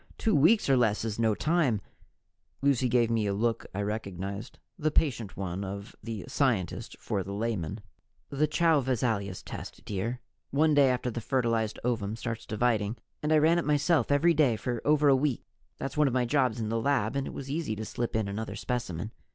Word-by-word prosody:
Two 220 - +1
weeks 170 +10 +5
or 135 - +5
less 110 -3 +2
is 110 0 -3
no 110 -2 +3
time 150 -8 +2 0.4
" - - -46
Lucy 135 -3 +3
gave 120 -1 +3
me 110 -2 +1
a 100 - 0
look 115 +2 0
I 100 +2 -2
recognized, 100 -1 -4 0.2
the 155 - 0
patient 120 - 0
one 95 0 -3
of 100 +2 -6
the 110 -5 -5
scientist 120 - 0
for 105 -4 -2
the 100 +2 -5
layman. 105 -3 -2 0.5
"The 145 +2 +2
Chow 155 0 +3
Visalius 115 -7 -1
test, - - -8
dear. 110 +5 -3 0.3
One 155 +3 +3
day 140 -2 +5
after 125 -1 0
the 120 - -4
fertilized 115 -3 0
ovum 110 -4 -1
starts 115 -1 -5
dividing 110 0 0
" - - -49
"And 150 - -1
I 155 - +6
ran 160 +3 +4
it - - -1
myself 150 -2 +2
every 165 +4 +4
day 145 -7 +3
for 120 +2 -3
over 150 0 +4
a 140 - +7
week. 135 -2 0 0.3
That's 135 - -5
one 150 -1 +5
of 130 - -1
my 125 -1 +2
jobs 125 -3 +1
in 110 -1 -2
the 115 0 0
lab 125 -3 +1
and 140 -1 -1
it - - -6
was 135 0 -6
easy 150 -8 -2
to 110 +1 -5
slip 120 +1 -3
in 110 -2 0
another 105 +3 -4
specimen. 110 -6 -3
120 Hz, 205 wpm, -29 LUFS, 105-140 Hz, 0.5 s, a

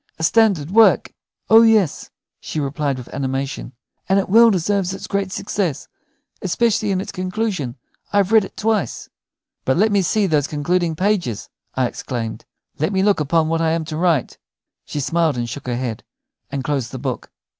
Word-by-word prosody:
"A 160 - -5
standard 185 -5 +3
work!" 225 +2 +4 0.3
"Oh 225 +1 +8
yes," 220 -8 +3 0.3
she 155 - -5
replied, 140 -1 -1
with 125 - -10
animation; 135 -1 -3 0.4
"and 195 - +4
it 195 - 0
well 230 +3 +7
deserves 190 0 0
its - - -8
great 200 -1 -2
success, 180 -7 -2 0.5
especially 215 +3 +1
in 190 -2 +1
its 190 - -5
conclusion. 185 - -3 0.4
I 205 - +1
have 200 0 +2
read 220 -2 +6
it - - -10
twice." 215 - -1 0.5
"But 130 - +1
let 215 +3 +3
me 200 -1 +3
see 205 +3 +1
these 150 -5 +1
concluding 165 +3 0
pages," 170 - -1 0.3
I 130 - +2
exclaimed. 120 -2 -5 0.3
"Let 155 +6 0
me 190 0 +2
look 205 -3 +3
upon 155 +2 +2
what 165 0 0
I 160 -1 +2
am 165 -1 -1
to 155 0 -5
write." 165 -5 0 0.5
She 150 - -4
smiled, 160 0 +1
and 120 -1 -2
shook 130 +4 -7
her 120 -1 -1
head, 120 -3 -4 0.5
and 140 -2 -3
closed 135 -5 -2
the 130 - -5
book. 130 -1 -4
165 Hz, 180 wpm, -20 LUFS, 140-200 Hz, 0.5 s, Oh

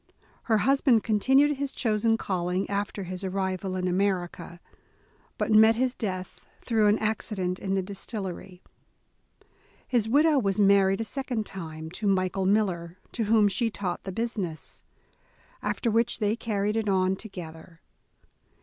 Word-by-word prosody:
Her 220 -2 +3
husband 265 -1 +3
continued 265 +7 +3
his 280 0 -2
chosen 225 -1 +1
calling 180 -2 -2
after 200 0 -2
his 185 +1 -6
ar 190 - -2
rival 190 0 -2
in 185 0 -1
America, 180 -2 -1 0.8
but - - -1
met 220 +1 +7
his 250 +1 0
death 185 -6 -5 0.2
through 220 -3 +2
an 210 +1 +4
accident 200 -4 -1
in 195 -1 -2
the 190 - 0
distillery. 190 -2 -6 1.2
His 230 -4 +1
widow 295 +3 +4
was 195 -4 0
married 195 0 +4
a - - 0
second 245 -2 -3
time, 160 -4 -7
to 205 +3 -3
Michael 185 0 +1
Miller, 185 -4 0
to 230 - -2
whom 215 -1 +4
she 225 +4 +1
taught 195 -4 -4
the 190 - -5
business, 200 -6 -4 0.8
after 235 - -1
which 230 +2 +1
they 215 -1 +1
carried 210 -2 -1
it 220 -2 0
on 190 0 +2
together. 165 -5 -10
200 Hz, 145 wpm, -27 LUFS, 185-225 Hz, 1.2 s, met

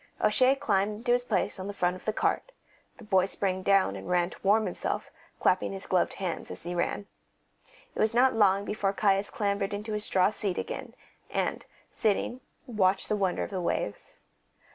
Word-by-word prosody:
O'Shea 260 +1 +4
climbed 215 -4 0
to 240 - +2
his 245 0 +2
place 215 - 0
on 185 - -5
the 205 - -5
front 180 -1 +1
of 185 - -13
the 215 - +1
cart; - - -1 0.4
the 240 - -13
boy 190 -3 +3
sprang 190 -1 -1
down 195 - +3
and 95 0 -8
ran 175 0 +2
to - - -12
warm 210 +2 +3
himself, - - -3 0.3
clapping 185 +1 +2
his 195 0 -7
gloved 185 -2 +1
hands 185 -4 -4
as - - -9
he 175 +1 -4
ran. 175 +3 -1 0.9
It - - -8
was 220 +1 +2
not 260 +2 +5
long 200 -2 +3
before 205 -2 -1
Caius 195 0 +2
clambered 200 -1 -1
into 210 +1 -5
his 210 0 -1
straw 190 -1 +3
seat 200 -4 -2
again, - - -5 0.3
and, - - -2 0.3
sitting, 225 +4 0 0.2
watched 195 -6 +1
the 215 - +2
wonder 190 -3 0
of - - -6
the 190 -2 -2
waves. 105 -11 -3
200 Hz, 190 wpm, -28 LUFS, 185-215 Hz, 0.9 s, not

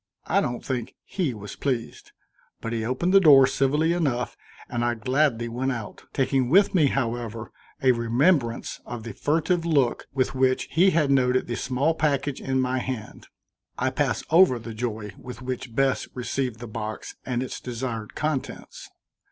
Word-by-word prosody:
I - - +2
don't 120 0 -3
think 125 -3 -3
he 160 - -2
was 105 -1 -8
pleased, 125 -5 -3 0.5
but 115 - -4
he 115 -1 -1
opened 130 - 0
the 195 - +9
door 145 -7 +8
civilly 145 +5 +1
enough 135 -8 -1 0.3
and 120 -1 -2
I 120 0 +1
gladly 125 0 +1
went 125 +3 -1
out, 115 -3 -8
taking 135 -2 +1
with 195 +7 +5
me, 160 -6 +4
however, 115 -4 -3 0.3
a 130 - +6
remembrance 120 +2 +1
of 120 -2 -7
the 115 -2 -6
furtive 165 - +1
look 145 -7 +1
with 130 -1 0
which 130 -1 +1
he 180 +4 +5
had 155 -5 +2
noted 130 -1 +3
the 120 - -3
small 135 +7 0
package 145 -3 0
in 130 0 0
my 130 0 0
hand. 125 -4 -6 0.5
I - - 0
pass - - 0
over 165 -6 +6
the 115 0 -8
joy 110 -2 -4
with 125 0 -9
which 125 -2 -5
Bess 135 0 +1
received 125 -1 -2
the 120 - -7
box 110 0 -5
and 125 -1 -2
its 130 - -6
desired 120 -3 -5
contents. 150 -3 -4
130 Hz, 170 wpm, -25 LUFS, 120-140 Hz, 0.5 s, the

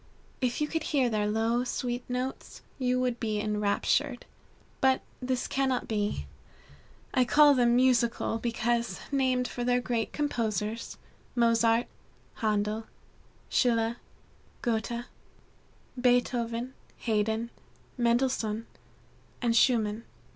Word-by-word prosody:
If 250 -2 0
you 300 - +2
could 325 +1 -2
hear 265 -6 +1
their 210 -1 +1
low, 225 +3 +1
sweet 245 0 -3
notes, 250 +1 -4 0.2
you 255 -1 +1
would 250 -2 0
be 215 -2 -1
enraptured. 210 +6 0 0.5
But 265 0 +3 0.2
this 255 0 -1
cannot 265 -2 0
be. 205 - -1 0.9
I 255 - +4
call 290 +4 +6
them 240 -2 +3
musical, 240 -3 +2
because 235 -3 -1
named 260 -2 +1
for 245 - -4
the 245 0 +2
great 240 -2 -2
composers, 230 -6 -2 0.4
Mozart, 230 0 +3 0.5
Handel, 215 0 0 0.6
Schiller, 230 -2 +2 0.7
Goethe, 235 +1 -1 0.9
Beethoven, 245 -1 +1 0.2
Haydn, 220 +1 0 0.4
Mendelssohn, 235 -2 +1 0.7
and 235 -2 +1
Schumann. 225 -2 +3
235 Hz, 105 wpm, -29 LUFS, 225-250 Hz, 0.9 s, call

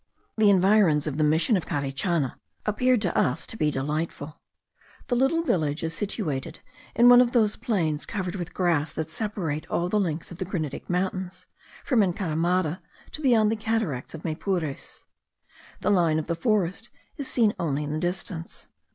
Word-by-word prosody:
The 215 -2 +4
environs 190 -6 +4
of 150 0 -3
the - - +3
Mission 160 - +3
of 180 - -2
Carichana 140 0 -1 0.3
appeared 245 +2 +2
to 180 - -1
us 130 +5 +1
to - - -5
be 155 -8 +1
delightful. 150 +1 -3 0.7
The 245 - +2
little 270 +7 +2
village 155 - 0
is 165 0 -2
situated 165 - -3 0.4
in 235 +2 +6
one 245 0 +9
of 245 -1 +1
those 215 -4 +3
plains 160 -9 -1
covered 185 -5 -3
with 175 -3 -5
grass 165 -5 +1
that 160 0 -4
separate 170 -6 -3
all 175 +1 0
the 210 - +2
links 165 -4 -2
of 175 - -10
the 185 - -2
granitic 155 -6 -4
mountains, 185 0 -2 0.4
from 250 -6 +3
Encaramada 175 -2 0 0.3
to 305 - -7
beyond 225 -6 +4
the - - +1
Cataracts 215 - -2
of 160 - -10
Maypures. 160 -2 -3 0.8
The - - +2
line 170 -5 +3
of 155 - -2
the 170 - -1
forests 200 +3 0 0.3
is 280 - -4
seen 220 -4 +2
only 150 -3 -1
in 145 - -4
the 155 - -1
distance. 175 0 -5
175 Hz, 170 wpm, -26 LUFS, 155-210 Hz, 0.8 s, one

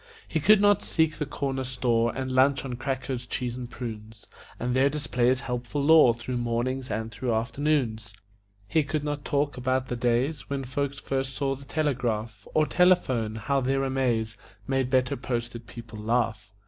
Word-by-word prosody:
He 160 - -1
could 200 +7 +6
not 205 0 +4
seek 160 -2 +1
the 150 - -2
corner 135 -2 -2
store 120 -2 +1
And 130 -1 -3
lunch 135 +2 +3
on 130 - -4
crackers, 130 -1 -3
cheese 125 -1 -3
and 125 -1 -6
prunes, 110 -3 -8 0.3
And 125 +1 -1
there 135 +2 +4
display 140 -4 0
his 130 +1 +2
helpful 125 +2 -3
lore 150 -6 +7
Through 120 +1 -4
mornings 120 +2 -1
and 110 +1 -3
through 120 +3 -2
afternoons; 115 -2 0 0.6
He 160 - +3
could 145 +1 -2
not 145 -1 -3
talk 145 -1 0
about 130 +1 0
the 125 - -1
days 125 +6 0
When 140 -1 -2
folks 140 +2 -2
first 135 -1 -2
saw 135 -1 0
the 135 +1 -10
telegraph 120 -8 -2
Or 155 - +4
telephone; 140 -12 +2
how 135 +5 0
their 135 +1 +1
amaze 120 -5 0 0.3
Made 135 -2 +1
better 130 -1 +2
posted 120 -2 -4
people 115 -2 -9
laugh. 110 -2 -1
130 Hz, 175 wpm, -27 LUFS, 120-140 Hz, 0.6 s, lore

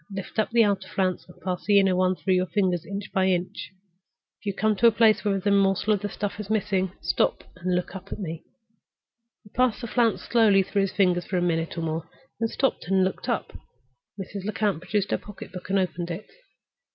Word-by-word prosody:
Lift 195 +2 -5
up 215 - +2
the 230 0 +5
outer 200 -2 0
flounce, 185 -2 -1
and 180 - -16
pass 180 -1 -3
the 205 -1 +6
inner 190 -2 +3
one 185 0 +2
through 190 +1 0
your 185 0 +2
fingers, 185 -5 0
inch 200 +1 -5
by 190 -1 +3
inch. 180 -1 -1 0.7
If - - -12
you - - +2
come 215 +1 +2
to 235 - +6
a - - +7
place 220 -1 +4
where 205 -2 +1
there - - +1
is - - -23
a 205 - +3
morsel 200 +1 +3
of 200 - -1
the 205 - -3
stuff 205 +1 -4
missing, 200 -4 0
stop - - +1
and 180 0 -1
look 180 +2 -2
up 190 +1 -9
at - - -4
me." 165 -5 -5 1.0
He 205 - -17
passed 250 -2 +2
the - - -4
flounce 235 -1 +1
slowly 215 -5 +4
through 200 +1 0
his 195 -1 0
fingers 180 -3 +2
for 185 - -1
a - - +1
minute 165 -1 -1
or - - -1
more, 165 0 -3 0.3
then 230 - +1
stopped 260 -6 -1
and 190 0 +3
looked 185 0 -2
up. - - -2 0.7
Mrs. 195 0 -6
Lecount 205 -4 -1
produced 200 +1 -1
her - - +1
pocket 210 -2 -10
book 185 0 -9
and 195 - +2
opened 175 -2 -1
it. 175 +5 -5
195 Hz, 225 wpm, -26 LUFS, 180-210 Hz, 1.0 s, a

